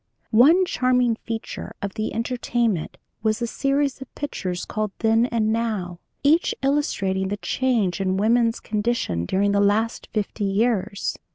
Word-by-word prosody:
"One 315 +12 +6
charming 250 -7 +2
feature 225 -1 -5
of 200 -1 -4
the 215 - -3
entertainment 235 -5 -1 0.2
was 220 -1 +1
a 240 - -1
series 275 +2 0
of 265 - -9
pictures 185 -11 -4
called 215 -1 -2
'Then 225 +1 +3
and 220 -3 +1
Now,' 210 -7 -2 0.2
each 315 +5 +3
illustrating 195 -10 0
the 205 +2 -2
change 210 -7 0
in 190 0 0
woman's 230 +2 +2
condition 210 - -1
during 200 +2 +2
the 200 - +2
last 215 +3 +1
fifty 210 0 -2
years. 200 -1 0
225 Hz, 145 wpm, -23 LUFS, 200-245 Hz, 0.2 s, One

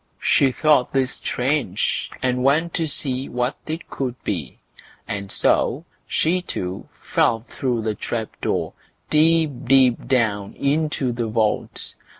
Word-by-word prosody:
She 135 -2 +3
thought 145 -1 +3
this 135 -2 +1
strange, 125 -6 -1
and 125 0 +1
went 160 +5 +2
to 165 - 0
see 135 -2 -1
what 125 +3 -1
it 160 +2 -4
could 130 -3 -3
be; 80 -10 -3 0.5
and 100 -1 -4
so - - +2 0.2
she 180 +3 +1
too 95 - -5
fell 115 - +2
through 120 -1 -2
the 110 -1 0
trap 110 +1 -3
door, - - -1 0.4
deep, 160 0 +4
deep 130 -2 +4
down, 110 -6 +1
into 145 -2 0
the 120 -1 -2
vault. 110 -1 -1
130 Hz, 135 wpm, -22 LUFS, 115-150 Hz, 0.5 s, deep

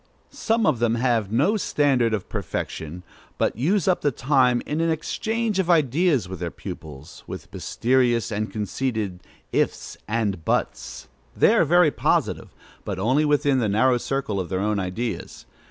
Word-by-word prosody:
Some 225 -1 0
of 145 -7 +2
them 115 -1 +2
have 115 -4 0
no 145 - +2
standard 135 - +2
of 105 -4 -2
perfection, 80 +3 -5 0.3
but - - 0
use 175 - +1
up 185 - +2
the 145 - +2
time 125 -2 +2
in 150 +2 -2
an 165 - +1
exchange 220 +6 -1
of 185 -2 0
ideas 155 - +3
with 95 0 -7
their 85 -1 -3
pupils, 75 -1 -10
with - - -9
mysterious 120 -1 +1
and 110 +1 -2
conceited 105 -3 -3 0.3
"ifs" - - -1
and 105 -6 -1
"buts." - - -2 0.3
They - - +5
are - - +4
very 175 0 +4
positive, - - 0 0.3
but 100 -3 -4
only 130 +10 +2
within 145 -2 +2
the 110 -4 +1
narrow 125 +5 +3
circle 125 -7 -2
of 90 -3 -4
their 95 - -1
own 105 +1 0
ideas. 100 +6 -4
125 Hz, 160 wpm, -24 LUFS, 105-150 Hz, 0.3 s, They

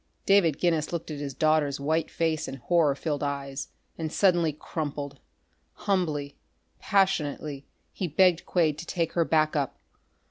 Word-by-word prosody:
David 190 -7 +4
Guinness 165 -4 +1
looked 165 -2 -4
at 150 - -5
his 140 -2 -5
daughter's 155 -3 +2
white 160 +3 0
face 160 -2 -1
and 135 - -6
horror 160 -3 +2
filled 145 -1 -3
eyes 140 -1 -3 0.3
and 160 -1 -3
suddenly 175 -5 +3
crumpled. 145 -2 -5 0.5
Humbly, 155 -8 -1 0.4
passionately, 150 -7 0 0.3
he 185 - -2
begged 175 +2 +3
Quade 155 -4 +1
to 165 - -7
take 165 -2 -1
her 170 - +3
back 155 -1 +2
up. 140 -3 -1
155 Hz, 145 wpm, -27 LUFS, 145-170 Hz, 0.5 s, David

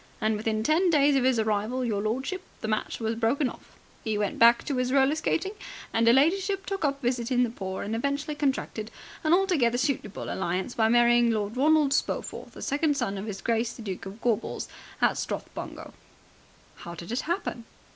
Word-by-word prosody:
And 220 0 +1
within 215 0 -1
ten 330 +7 +3
days 290 -3 +4
of 265 - +3
his 255 -1 +3
arrival, 220 +4 0
your 210 -4 -1
lordship, 265 - -2 0.2
the - - -3
match 215 0 -2
was 225 -1 -1
broken 235 +5 +1
off. - - -11 0.3
He 215 -2 -1
went 205 -1 -2
back 235 +1 +6
to 275 -3 -2
'is 255 0 0
roller 270 +1 +4
skating, 330 +4 -1 0.4
and 230 0 +2
'er - - +8
ladyship 380 +8 +2
took 390 -3 -3
up 280 -1 0
visiting 245 0 +1
the 235 - -1
poor 190 -4 -5
and 215 +3 -3
eventually 280 +5 -1
contracted 265 -7 -2 0.3
an 310 - +1
altogether 340 -11 +3
suitable 245 -6 -2
alliance 190 +5 -2
by 220 -1 +2
marrying 240 0 +5
Lord 215 -1 -1
Ronald 295 +1 +4
Spofforth, - - -2
the - - -8
second 290 0 +1
son 195 - -1
of 200 +2 -5
his 195 -2 -5
Grace 230 0 0
the 230 - -10
Duke 195 -2 -5
of 195 +3 -9
Gorbals 230 -4 -1 0.3
and - - +4
Strathbungo." - - -6 0.8
"How 170 0 -8
did 170 +4 -8
it 240 - 0
happen?" 335 - -3
240 Hz, 190 wpm, -27 LUFS, 220-285 Hz, 0.8 s, er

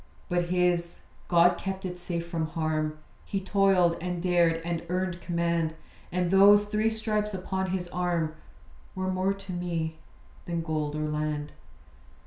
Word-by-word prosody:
But 175 -1 +1
his 175 -1 0 0.3
God 175 0 +5
kept 190 0 -4
it 180 -1 -5
safe 170 -1 -3
from 165 -2 -2
harm. 155 -1 -1 0.3
He 195 - -2
toiled, 190 -3 +3
and 180 0 -2
dared, 170 -2 +3
and 170 -1 -2
earned 180 -1 -1
command; 170 -2 0 0.4
And 180 0 0
those 200 +2 +7
three 215 +1 +1
stripes 215 -2 -1
upon 190 0 -2
his 180 -1 -2
arm 175 -3 0 0.6
Were 185 0 -1
more 185 +1 +1
to 195 -1 -8
me 165 -2 -3 0.5
than 170 -1 -1
gold 155 -2 -2
or 155 0 -1
land. 150 -1 -2
175 Hz, 145 wpm, -28 LUFS, 165-190 Hz, 0.6 s, those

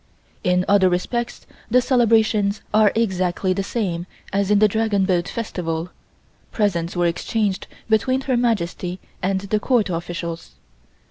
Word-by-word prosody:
In 180 0 +2
other 200 -2 +5
respects 235 +7 -2 0.2
the 250 +3 +5
celebrations 220 -5 +2
are 215 -1 +5
exactly 185 -4 0
the 195 - -1
same 185 -5 -2 0.3
as 200 0 +1
in 210 - +5
the 215 +1 +6
Dragon 210 -2 +1
Boat 180 -2 0
Festival, 175 -6 -3 0.6
presents 180 -6 0
were 175 0 +1
exchanged 190 +3 -1 0.2
between 255 +4 +2
Her 265 -1 0
Majesty 190 -6 -1 0.2
and 190 0 0
the 200 +2 -1
Court 225 -4 +1
officials. 170 0 -5
200 Hz, 135 wpm, -22 LUFS, 180-220 Hz, 0.6 s, the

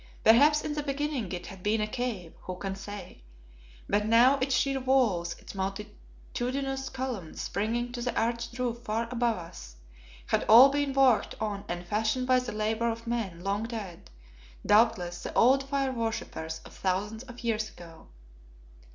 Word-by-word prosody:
Perhaps 290 +7 +6
in 300 - -2
the 295 - -2
beginning 280 - -2
it 180 -1 -5
had 190 -2 -10
been 210 +3 +1
a 215 - +1
cave, 215 -7 -4
who 185 - -6
can 195 +1 -4
say? 200 - -9 0.7
but 210 +1 +1
now 245 +5 +5
its 265 0 +1
sheer 275 -1 +1
walls, 240 -10 +1
its - - -11
multitudinous 245 +7 -4
columns 255 -11 -5
springing 230 +5 -2
to 245 -1 -5
the 245 +1 -1
arched 235 +1 -2
roof 240 -2 -2
far 230 0 -2
above 235 -3 +1
us, - - -10 0.5
had - - +1
all 240 +5 +9
been 285 0 0
worked 265 -4 +3
on 205 -2 -3
and 175 0 -4
fashioned 220 +6 0
by 255 0 +4
the 250 -1 -5
labour 220 +2 0
of 230 0 -5
men 220 -8 -3
long 200 +1 0
dead; 210 - -7 0.6
doubtless 205 -5 +3
the - - -5
old 270 +3 +4
fire 275 -1 0
worshippers 225 -9 -4
of - - -13
thousands 200 +4 -2
of 245 -1 -11
years 220 -2 0
ago. 165 -3 -14
230 Hz, 165 wpm, -29 LUFS, 200-255 Hz, 0.7 s, all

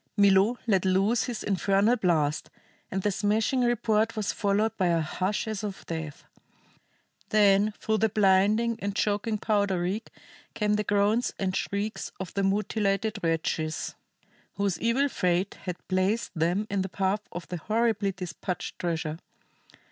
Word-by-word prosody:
Milo 200 +3 +5
let 195 -6 +2
loose 195 +5 +2
his 240 -4 -4
infernal 200 +3 +2
blast, 160 -8 0 0.4
and 190 0 -3
the 205 - +2
smashing 215 +6 +1
report 225 -2 +1
was 215 -3 -1
followed 210 +2 +1
by 185 -4 +1
a 170 -1 +2
hush 185 +7 -2
as 215 -1 -3
of 200 -2 -6
death. 160 -3 -6 1.0
Then 205 0 +4
through 220 -1 0
the 220 - +3
blinding 210 +3 +3
and 200 0 -3
choking 215 +2 0
powder 200 -3 +1
reek 190 +6 -2 0.5
came 210 -1 +1
the 210 0 +1
groans 205 +4 +1
and 190 -1 -1
shrieks 205 +2 -3
of 190 -2 -6
the 200 - 0
mutilated 205 +1 0
wretches 160 -1 -1 0.6
whose 200 -4 -1
evil 235 +5 +2
fate 180 -5 0
had 180 -2 -6
placed 190 +4 0
them 175 +5 0
in 200 -1 +1
the 190 - -3
path 195 +2 0
of 175 -4 -7
the 180 - -3
horribly 215 +2 0
despatched 180 0 -5
treasure. 165 -2 -2
200 Hz, 150 wpm, -27 LUFS, 185-215 Hz, 1.0 s, Milo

